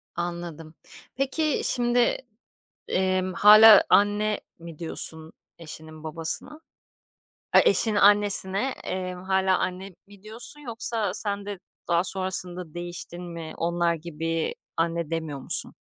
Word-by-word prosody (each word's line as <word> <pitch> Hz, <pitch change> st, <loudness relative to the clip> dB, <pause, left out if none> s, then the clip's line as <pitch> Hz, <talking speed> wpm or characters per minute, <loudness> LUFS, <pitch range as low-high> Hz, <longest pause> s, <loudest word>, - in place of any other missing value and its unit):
Anladım. 170 Hz, -2 st, -6 dB, 0.4 s
Peki, 275 Hz, +3 st, -1 dB
şimdi, 240 Hz, -1 st, +1 dB, 0.7 s
emm, 185 Hz, 0 st, -1 dB
hâlâ 215 Hz, +3 st, +8 dB
anne 205 Hz, +1 st, +2 dB, 0.2 s
mi 165 Hz, -1 st, -12 dB
diyorsun 160 Hz, -1 st, +1 dB, 0.2 s
eşinin 155 Hz, -1 st, -10 dB
babasına? 165 Hz, -, -1 dB, 0.9 s
Ay, -, -, +7 dB
eşinin 220 Hz, -2 st, +2 dB
annesine, 205 Hz, +3 st, +3 dB
eee, 185 Hz, -1 st, -4 dB
hâlâ 190 Hz, +1 st, 0 dB
anne 185 Hz, +1 st, -4 dB, 0.2 s
mi 200 Hz, 0 st, -18 dB
diyorsun 230 Hz, +7 st, -3 dB
yoksa 230 Hz, -6 st, -3 dB
sen 200 Hz, -1 st, -2 dB
de 200 Hz, -2 st, -7 dB, 0.3 s
daha 170 Hz, +1 st, +1 dB
sonrasında 180 Hz, -3 st, 0 dB
değiştin 175 Hz, 0 st, -7 dB
mi, 170 Hz, -2 st, -8 dB
onlar 170 Hz, 0 st, 0 dB
gibi 165 Hz, 0 st, -4 dB, 0.2 s
anne 165 Hz, -1 st, -2 dB
demiyor 160 Hz, -4 st, -4 dB
musun? -, -, +3 dB
185 Hz, 115 wpm, -25 LUFS, 165-205 Hz, 0.9 s, hâlâ